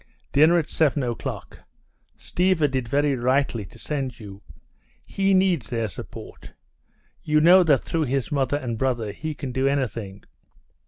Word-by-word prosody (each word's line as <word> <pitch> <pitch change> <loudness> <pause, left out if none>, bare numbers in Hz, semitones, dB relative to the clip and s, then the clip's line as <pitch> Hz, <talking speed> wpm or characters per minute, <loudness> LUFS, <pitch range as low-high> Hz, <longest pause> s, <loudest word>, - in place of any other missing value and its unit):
Dinner 155 +5 +5
at 160 -3 0
seven 150 -3 +1
o'clock. 120 -2 -5 0.6
Stiva 180 -4 +1
did 130 -3 -3
very 145 +3 +1
rightly 125 -3 0
to - - -15
send 135 -5 -4
you. 100 -2 -11 0.6
He 195 0 +1
needs 180 - +1
their 115 -2 -1
support. 95 - -10 0.7
You 155 0 +2
know 175 +4 +7
that 150 -7 +3
through 165 -2 -1
his 130 -3 -2
mother 140 -1 0
and 120 -5 -4
brother 120 -5 -1
he 155 +8 -6
can 135 -2 -6
do 130 +2 0
anything. 115 -8 -3
135 Hz, 150 wpm, -24 LUFS, 120-155 Hz, 0.7 s, know